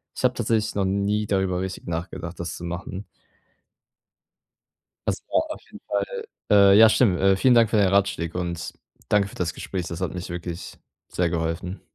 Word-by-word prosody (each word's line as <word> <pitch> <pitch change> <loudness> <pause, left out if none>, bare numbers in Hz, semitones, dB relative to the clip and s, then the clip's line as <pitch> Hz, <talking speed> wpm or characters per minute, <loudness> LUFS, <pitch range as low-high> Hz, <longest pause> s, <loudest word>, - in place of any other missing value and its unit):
ich - - -6
habe 125 0 +4
tatsächlich 110 -2 0
noch 100 -1 0
nie 100 +2 0
darüber 95 -2 0
richtig 95 0 -5
nachgedacht, 85 0 -5
das 85 -1 -4
zu - - -10
machen. 90 +3 -5 2.0
Das - - 0
braucht 315 - -1
auf 310 - -6
jeden - - -12
Fall 480 -3 -2 0.3
Äh, 100 -1 +7
ja, 110 +1 +9
stimmt. 95 -4 +3
Vielen 125 +4 +5
Dank 115 -2 +5
für - - +2
deine 100 -3 +3
Ratschläge 90 -4 +1
und 85 -1 -4 0.4
danke 100 -1 +3
für - - -14
das 85 -2 -2
Gespräch. 90 -3 -4
Das 85 - -6
hat - - -2
mich 90 0 -5
wirklich 85 0 -6 0.3
sehr 90 -2 0
geholfen. 85 +3 -3
95 Hz, 175 wpm, -24 LUFS, 85-105 Hz, 2.0 s, ja